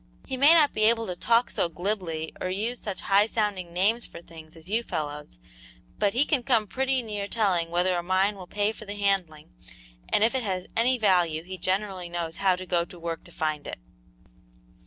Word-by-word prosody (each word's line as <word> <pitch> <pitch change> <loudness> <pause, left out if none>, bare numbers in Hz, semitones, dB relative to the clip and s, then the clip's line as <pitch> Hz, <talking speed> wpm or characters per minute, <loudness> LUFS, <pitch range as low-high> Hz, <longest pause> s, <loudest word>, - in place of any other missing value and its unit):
He 265 - -3
may 285 +6 +7
not 305 -3 +5
be 215 - +2
able 230 0 +3
to 180 - -4
talk 230 +6 +2
so 170 - 0
glibly 175 -3 -3
or 185 - -1
use 220 +6 -2
such 200 -3 -4
high 200 +2 +4
sounding 205 -6 -2
names 205 +7 +1
for - - -10
things 165 -1 -13
as 165 +1 -14
you 220 +4 +1
fellows, 150 - -5 0.6
but 200 -1 +2
he 260 +5 +3
can 290 -5 +1
come 235 -3 +2
pretty 265 +3 0
near 205 -3 -4
telling 190 -7 +1
whether 180 +2 +1
a 175 - 0
mine 190 +3 +1
will 185 -2 -10
pay 205 +2 0
for 220 - -10
the 205 0 -6
handling, 190 - -1 0.6
and 210 - +4
if 230 - +3
it 260 - 0
has 185 -5 -2
any 250 +3 +3
value 175 -7 +2
he 185 +2 -6
generally 185 -1 -2
knows 170 -1 -4
how 190 -2 +3
to 185 +1 -7
go 175 -2 +1
to 175 +1 -12
work 165 -1 -4
to - - -14
find 155 -2 -2
it." - - -5
195 Hz, 210 wpm, -27 LUFS, 175-220 Hz, 0.6 s, may